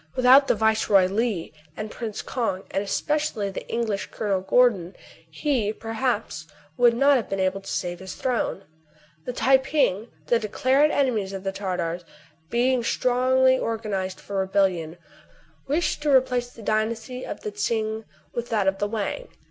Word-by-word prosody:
Without 260 +2 +6
the - - +3
Viceroy 215 -3 +3
Li, 200 -3 -1 0.2
and 215 0 -5
Prince 225 -3 -5
Kong, 220 -7 -2
and 195 - 0
especially 230 -1 -1
the. - - -7
English 220 -4 -2
Colonel 200 -3 -1
Gordon, 190 -3 +2 0.3
he, 255 -9 0
per 225 +1 -7
haps, 220 -9 -2 0.3
would 240 +2 +4
not 275 +3 +5
have 230 - -4
been 195 - -2
able 190 +1 0
to - - -9
save 175 -1 -3
his 190 0 -8
throne. 245 -6 -1 0.6
The 250 - -3
Tai 265 +2 +4
ping, 265 -6 0 0.2
the 235 - +2
declared 260 +7 +2
enemies 230 -10 0
of 190 -1 -6
the 195 - -1
Tar 190 -2 -3
tars, 170 +1 -3 0.5
being 245 +2 +2
strongly 260 +2 +3
organized 200 -5 -3
for 200 - -6
rebellion, 190 -4 0 0.7
wished 300 +2 0
to 295 - 0
replace 250 -2 +2
the 230 -2 -13
dynasty 225 +4 -2
of - - -6
the 210 - -4
Tsing 220 +1 -2 0.3
for 240 - -1
that, 220 -4 -1
of 195 0 +1
the 205 - 0
Wang. 220 - -3
220 Hz, 165 wpm, -24 LUFS, 195-250 Hz, 0.7 s, Without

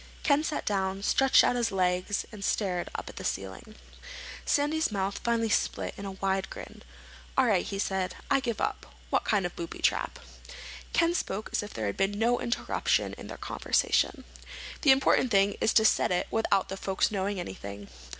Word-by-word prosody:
Ken 290 0 +3
sat 310 -1 -2
down, 195 -1 -1
stretched 270 +5 +5
out - - +2
his 240 -2 0
legs, 185 +1 0
and 210 -3 -9
stared 185 -5 0
up - - -5
at - - -10
the - - -6
ceiling. 95 - -5 0.7
Sandy's 295 -1 +1
mouth 195 -1 -2
finally 230 -1 +1
split 215 - 0
in 200 - -7
a 195 - -5
wide 190 0 -1
grin. - - -10 0.6
"All 265 - +5
right," 205 -7 +3
he 195 - -5
said. 190 -2 -1
"I 275 - +3
give 240 -4 -3
up. - - -3 0.2
What - - +1
kind 200 -4 +2
of 175 - -4
booby 170 -1 -6
trap?" - - 0 0.7
Ken 335 0 +3
spoke 210 - -3
as - - 0
if 210 - -9
there 110 - -2
had 100 - -2
been 195 +1 0
no 235 +3 +2
interruption 235 - 0
in - - -9
their - - -8
conversation. - - 0 0.6
"The 295 - +3
important 265 -1 +4
thing 200 -2 +3
is 220 - +3
to 220 - +5
set - - +3
it 180 - +1
without 210 -3 +1
the 195 - -4
folks 195 +1 0
knowing 200 -1 -1
anything." 100 - -7
200 Hz, 190 wpm, -29 LUFS, 190-235 Hz, 0.7 s, stretched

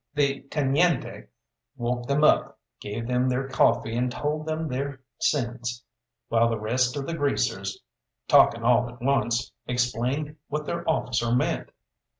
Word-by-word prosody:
The 140 -1 +1
teniente 150 +2 +1 0.5
woke 120 0 -2
them 140 +2 +2
up, 150 - +3 0.2
gave 105 +3 -5
them 125 +1 +1
their 130 +1 -1
coffee 120 -3 +2
and 125 +1 0
told 150 +4 -2
them 160 0 -2
their 135 0 -4 0.2
sins, 120 -2 -1 0.4
while 115 0 +3
the 115 - -1
rest 125 +5 0
of 140 - -3
the 165 - -3
greasers, 100 - -1 0.5
talking 115 - +5
all 120 0 +3
at 120 +1 -13
once, 120 -2 +1 0.2
explained 125 +5 -1
what 150 +1 -3
their 170 - -3
officer 120 -6 0
meant. 125 - 0
125 Hz, 145 wpm, -26 LUFS, 120-145 Hz, 0.5 s, talking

